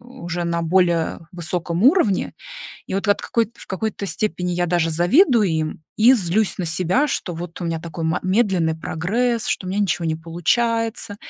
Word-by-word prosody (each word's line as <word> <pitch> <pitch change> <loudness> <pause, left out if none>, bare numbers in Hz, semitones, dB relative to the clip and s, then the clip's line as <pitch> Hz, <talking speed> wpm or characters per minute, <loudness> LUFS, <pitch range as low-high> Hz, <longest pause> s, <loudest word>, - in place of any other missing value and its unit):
уже 205 -9 -6
на 170 0 -1
более 170 -1 +1
высоком 175 +1 -2
уровне, 270 - +3 0.5
и - - -5
вот 195 +2 -2
от 205 - +2
какой 230 -2 0
в - - -11
какой-то 200 +1 -3
степени 180 -3 -2
я 175 0 0
даже 165 -1 +1
завидую 225 - +4
им 155 0 -2
и 235 +4 +7
злюсь 205 -1 +1
на 180 - -2
себя, 185 - +1
что 180 -9 -3
вот 170 +1 -7
у 175 - -2
меня 165 -1 -2
такой 165 -1 -6
ма 160 +2 0
медленный 185 -5 +1
прогресс, 220 +10 -1
что 185 - -1
у - - -4
меня 195 +2 -1
ничего 180 -4 0
не 160 -1 0
получается, 225 +6 -1
180 Hz, 180 wpm, -21 LUFS, 170-220 Hz, 0.5 s, и